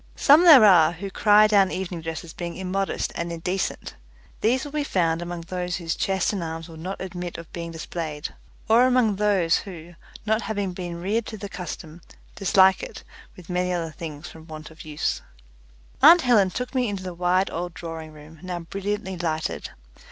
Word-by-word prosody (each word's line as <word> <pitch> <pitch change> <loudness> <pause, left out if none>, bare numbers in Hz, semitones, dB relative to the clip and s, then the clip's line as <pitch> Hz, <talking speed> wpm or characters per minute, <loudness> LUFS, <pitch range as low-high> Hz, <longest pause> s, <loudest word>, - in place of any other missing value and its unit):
Some 305 +5 +6
there 285 -10 +10
are 175 -5 +6
who 195 +3 -7
cry 210 +1 +5
down 200 -3 +4
evening 180 -3 -4
dress 160 -2 -5
as 165 -2 -11
being 170 -1 -6
immodest 190 +1 -2
and 170 0 -4
indecent. 180 +3 -3 0.5
These 255 +6 +1
will 290 - -8
be 300 0 -1
found 170 - 0
among 175 0 -5
those 180 +1 -4
whose 165 -2 -3
chest 190 +1 0
and 195 - -3
arms 165 0 -6
will 165 - -12
not 185 +5 -6
admit 180 -2 -6
of 170 -1 -11
being 170 -1 -5
displayed, 160 -2 -5 0.3
or 235 +3 +5
among 245 -6 +2
those 195 -5 +2
who, 175 -3 -9 0.3
not 220 +1 +1
having 200 -3 -3
been 175 -2 -6
reared 210 +6 -1
to 220 - -7
the 200 - -6
custom, 175 -3 -8 0.3
dislike 190 -1 +4
it - - -8 0.3
with 180 -2 -13
many 180 0 -1
other 170 -2 -2
things 155 0 -8
from 160 0 -13
want 155 -1 -9
of 160 - -12
use. 150 0 -2 0.8
Aunt 330 +5 +9
Helen 225 -8 +4
took 250 +6 -5
me 250 -3 +1
into 195 -2 -5
the 185 -1 -5
wide 180 +2 +1
old 175 +1 -5
drawing 165 -2 -7
room, 155 +1 -14
now 180 -1 -5
brilliantly 195 +2 -4
lighted. 160 -2 -3
180 Hz, 190 wpm, -24 LUFS, 165-200 Hz, 0.8 s, there